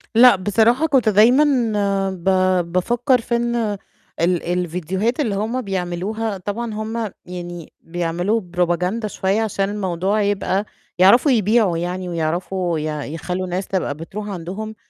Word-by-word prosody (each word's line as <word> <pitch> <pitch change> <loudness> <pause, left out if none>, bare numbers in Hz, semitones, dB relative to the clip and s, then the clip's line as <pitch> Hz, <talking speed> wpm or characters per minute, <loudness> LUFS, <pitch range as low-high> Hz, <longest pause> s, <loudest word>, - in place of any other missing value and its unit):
لأ، 245 -1 +8
بصراحة 225 +10 +2
كنت 255 -7 +3
دايمًا 235 +8 +5 0.7
ب 180 -3 -9 0.5
بافكّر 240 +7 +2
في 235 - -1
إن 235 0 0 0.7
ال 175 0 +1
الفيديوهات 180 - -1
اللي 225 -9 0
هُم 225 +5 -1
بيعملوها 195 +2 -3
طبعًا 215 +4 -4
هُم 220 0 -3
يعني 175 -2 -8
بيعملوا 175 +6 -1 0.2
propaganda 180 +5 0
شوية 195 +2 0
عشان 195 -3 -1
الموضوع 195 0 -1
يبقى 200 0 0 0.3
يعرفوا 235 - +6
يبيعوا 215 -5 +3
يعني 180 +1 -3
ويعرفوا 170 +1 -1
يع 150 -1 -3
يخلّوا 180 +5 -4
الناس 185 +2 -3
تبقى 180 -7 -1
بتروح 205 +6 -7
عندهم. 195 +4 -6
195 Hz, 130 wpm, -20 LUFS, 175-220 Hz, 0.7 s, لأ